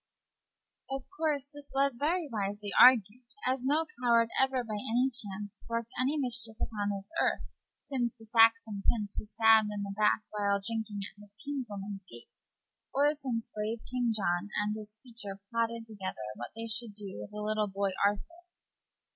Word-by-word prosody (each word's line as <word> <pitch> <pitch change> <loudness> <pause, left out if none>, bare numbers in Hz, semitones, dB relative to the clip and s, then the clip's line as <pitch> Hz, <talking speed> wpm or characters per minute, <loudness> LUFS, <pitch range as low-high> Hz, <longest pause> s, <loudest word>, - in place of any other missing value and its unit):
Of 270 -1 -3
course 300 -4 0
this 290 0 -8
was 275 -2 +2
very 325 +3 +1
wisely 205 -3 -3
argued, 245 -2 +7 0.2
as 255 0 +1
no 300 +5 +2 0.2
coward 235 -2 +4
ever 265 -1 +3
by 220 -2 -5
any 235 +5 +1
chance 205 -4 -5
worked 230 0 -2
any 275 +4 +2
mischief 240 -5 -1
upon 205 -2 -1
this 200 +6 -5
earth, - - +1 0.4
since 245 -4 0
the 225 - -14
Saxon 225 -2 +4
prince 210 -3 +1
was 210 - -8
stabbed 220 -1 +6
in 205 -1 -3
the 200 0 -4
back 215 +1 +3
while 200 -1 +1
drinking 220 -1 -3
at 205 0 -12
his 205 0 -17
kinswoman's 210 -8 -4
gate, 120 0 -11 0.6
or 290 +2 +4
since 255 -6 -3
brave 215 +2 -2
King 245 -2 +1
John 190 -2 0
and 210 0 0
his 215 -1 -6
creature 225 -5 -8
plotted 230 0 0
together 205 -4 -5 0.2
what 120 +3 -6
they 225 0 -4
should 225 -1 -2
do 200 - -7
with 105 - -7
the - - -9
little 215 0 0
boy 195 0 -1
Arthur. 335 - -1
225 Hz, 170 wpm, -31 LUFS, 205-250 Hz, 0.6 s, argued